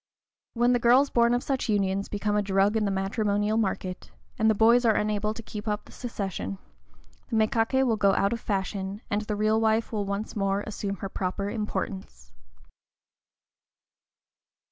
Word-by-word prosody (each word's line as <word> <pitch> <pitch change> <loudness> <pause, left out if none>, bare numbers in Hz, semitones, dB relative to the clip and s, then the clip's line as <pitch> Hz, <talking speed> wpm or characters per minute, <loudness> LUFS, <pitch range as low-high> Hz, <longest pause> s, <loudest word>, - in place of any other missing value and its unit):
When 240 +1 +3
the 245 - +2
girls 250 +4 +4
born 235 0 +3
of 245 - -1
such 265 -3 -2
unions 200 -1 0
become 205 0 -1
a 210 - +3
drug 200 +1 +2
in 215 -1 +1
the - - +1
matrimonial 205 +2 0
market, 190 -4 -2 0.3
and 220 0 +4
the 220 - +3
boys 230 +3 +5
are 225 -3 +4
unable 210 0 0
to 230 - -8
keep 210 0 -8
up 210 0 -2
the - - -16
succession, 190 - -5 0.7
the - - -2
mékaké 225 +4 +2
will 230 -3 +1
go 200 -1 +4
out 200 +3 +2
of 230 - -3
fashion, 195 0 -3
and 205 0 +1
the 210 0 -3
real 215 +1 +2
wife 220 +1 +1
will 210 -3 -2
once 200 +2 -4
more 195 -1 0
assume 200 -2 -4
her - - -1
proper 195 +2 -3
importance. 190 - -5
210 Hz, 170 wpm, -27 LUFS, 200-225 Hz, 0.7 s, boys